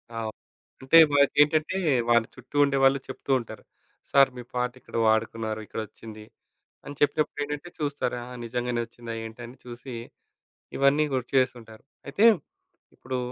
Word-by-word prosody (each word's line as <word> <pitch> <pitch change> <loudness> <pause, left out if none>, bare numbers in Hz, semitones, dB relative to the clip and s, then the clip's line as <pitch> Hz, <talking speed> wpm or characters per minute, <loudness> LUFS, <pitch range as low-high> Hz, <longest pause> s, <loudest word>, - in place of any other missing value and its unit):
ఆ‌! - - -3 0.6
అంటే 135 +5 +5 0.2
వారికేంటంటే 150 +4 +3 0.3
వాళ్ళ 120 -1 +5
చుట్టూ 130 +2 -15
ఉండేవాాళ్ళు 135 -1 +3
చెప్తూ 135 +1 -6
ఉంటారు. 115 - -10 0.5
సార్ 140 -1 +6
మీ - - -5
పాట 125 0 -1
ఇక్కడ - - -13
వాడుకున్నారు. 110 0 0
ఇక్కడొచ్చింది. 110 0 -8 0.6
అని 145 - -8
చెప్పినప్పుడు 145 0 +1
ఏంటంటే 150 +4 -6
చూస్తారు. 145 -4 -2
ఆహ్, 125 0 -10
నిజంగానే 120 0 -2
వచ్చిందా? 115 0 -9
ఏంట 110 +1 -9
అని 125 - -13
చూసి 120 +1 -9 0.8
ఇవన్నీ 140 +3 +4
గుర్తు 125 -2 -2
చేస్తుంటారు. 120 -4 -2 0.2
అయితే 175 +11 +2 0.7
ఇప్పుడు 130 +1 -5
125 Hz, 130 wpm, -26 LUFS, 115-140 Hz, 0.8 s, సార్